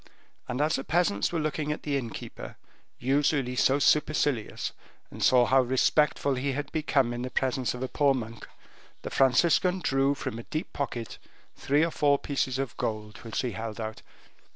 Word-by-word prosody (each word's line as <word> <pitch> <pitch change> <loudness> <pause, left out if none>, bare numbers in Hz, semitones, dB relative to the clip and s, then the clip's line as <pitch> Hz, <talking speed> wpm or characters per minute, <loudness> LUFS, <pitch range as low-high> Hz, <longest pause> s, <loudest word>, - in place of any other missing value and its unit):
And 125 +3 -2
as 155 +1 +2
the 135 - -4
peasants 160 - +1
were 170 - -1
looking 155 0 -2
at 150 - -5
the 145 -2 -1
innkeeper, 120 -5 -6 0.4
usually 135 0 +1
so 135 +2 +3
supercilious, 145 -5 +1 0.4
and - - -9
saw 125 -1 +5
how 130 +2 +4
respectful 140 +3 +2
he 135 +1 -1
had 145 +2 -4
become 140 -6 +1
in 120 - -4
the 130 - -3
presence 130 -1 -1
of 125 - -5
a - - -1
poor 140 0 +2
monk, 115 -2 -6 0.6
the - - -5
Franciscan 165 +7 +3
drew 135 -4 +1
from 115 -4 -5
a - - -7
deep 155 - -4
pocket 120 -5 -4 0.4
three 145 +4 +2
or 165 - -3
four 145 -2 +3
pieces 135 -2 -2
of 135 -3 -3
gold 105 -1 -4
which 115 -2 -4
he 125 - -1
held 110 0 -6
out. 110 -1 -5
135 Hz, 175 wpm, -28 LUFS, 120-145 Hz, 0.6 s, saw